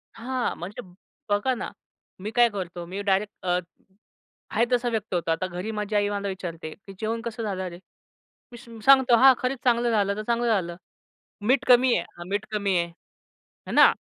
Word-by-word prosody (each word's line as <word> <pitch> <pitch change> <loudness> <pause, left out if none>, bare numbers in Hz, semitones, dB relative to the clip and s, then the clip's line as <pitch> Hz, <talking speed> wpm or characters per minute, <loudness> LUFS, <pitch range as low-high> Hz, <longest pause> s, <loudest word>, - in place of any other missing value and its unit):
हां, 255 +1 -2
म्हणजे 200 +8 -6 0.5
बघा 205 +6 +2
ना, 240 - -5 0.5
मी 210 +3 -5
काय 240 -1 +6
करतो 180 -4 -5
मी 190 +3 -5
डायरेक्ट 200 +1 +1
अ, 180 0 +2 0.9
आहे 230 +3 +3
तसा 245 0 +2
व्यक्त 220 -4 -3
होतो. 170 -2 0
आता 185 +3 0
घरी 185 +5 -5
माझी 210 0 -3
आई 205 0 +2
मला 200 0 -2
विचारते, 170 -4 -5
की 195 -1 -14
"जेवण 225 +1 -2
कसं 230 -1 -5
झालं 190 -3 -2
रे?" 175 +1 -11 0.7
मी 240 - -10
स 240 - -15 0.2
सांगतो, 265 -3 +7
"हां, 265 +1 +8
खरंच 255 +1 -1
चांगलं 240 -1 +3
झालं 200 -2 +2
तर 215 - -4
चांगलं 235 0 +1
झालं." 180 -6 0 0.7
"मीठ 260 +1 +3
कमी 250 0 +6
आहे?" - - -3
"हां, 175 +1 -8
मीठ 205 +2 -1
कमी 200 -3 +1
आहे," 170 - +2
आहे 170 - -23 0.6
ना. - - +9
210 Hz, 190 wpm, -25 LUFS, 185-240 Hz, 0.9 s, ना